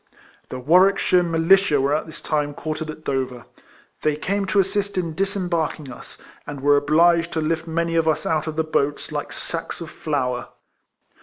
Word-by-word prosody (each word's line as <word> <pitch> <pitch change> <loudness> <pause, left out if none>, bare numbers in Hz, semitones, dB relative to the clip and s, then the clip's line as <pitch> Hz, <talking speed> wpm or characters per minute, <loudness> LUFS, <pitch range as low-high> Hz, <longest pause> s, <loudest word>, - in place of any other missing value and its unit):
The 130 - -5
AVarwickshire 180 +5 +4
Militia 170 -1 +3
were 140 +2 +1
at 155 - -1
this 160 +1 -10
time 150 -2 -1
quartered 155 +1 -4
at 155 0 -8
Dover. 130 -4 -3 0.6
They 155 -1 +1
came 195 +6 -2
to 190 +2 +2
assist 200 +1 0
in 170 -3 -1
disembarking 170 -6 -2
us, - - -13 0.3
and 145 -1 -6
were 145 +1 +4
obliged 165 +4 +3
to 160 - 0
lift 160 +1 -1
many 170 +1 -1
of 165 -1 +2
us 160 - +1
out 155 0 0
of 155 - -4
the 160 - +1
boats 145 -1 -1
like 150 -1 -4
sacks 165 -1 -5
of 165 -2 -8
flour. 125 -5 -2
160 Hz, 175 wpm, -22 LUFS, 145-170 Hz, 0.6 s, AVarwickshire